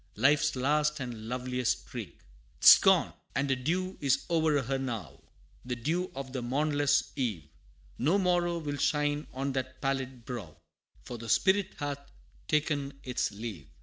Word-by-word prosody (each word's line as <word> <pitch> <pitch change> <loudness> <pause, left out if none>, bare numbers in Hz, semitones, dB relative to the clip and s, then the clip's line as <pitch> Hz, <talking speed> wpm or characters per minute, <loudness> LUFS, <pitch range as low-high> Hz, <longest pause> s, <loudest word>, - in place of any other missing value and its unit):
Life's 145 +1 +3
last 150 +4 +1
and 120 -4 -6
loveliest 125 0 -1
streak. - - -8 0.4
'Tis - - +10
gone, - - +4 0.2
and 140 0 +1
a - - +3
dew 180 +9 -2
is 135 -2 +2
o'er 160 -4 +2
her 135 +3 -1
now 110 - -5 0.4
The 125 0 -3
dew 165 +10 -1
of 135 -1 -6
the 130 - -2
mornless 145 +3 +1
eve 105 - -2 0.5
No 160 +10 +3
morrow 175 -2 +1
will 145 -3 -4
shine 150 0 0
on 135 +2 -2
that 130 -1 -4
pallid 130 -3 -3
brow, 105 - -7 0.5
For 120 - -7
the 115 0 -7
spirit 190 - +2
hath 145 -1 -3 0.5
ta'en 145 -2 0
its 125 -1 -1
leave. 100 - -7
135 Hz, 150 wpm, -30 LUFS, 125-150 Hz, 0.5 s, Tis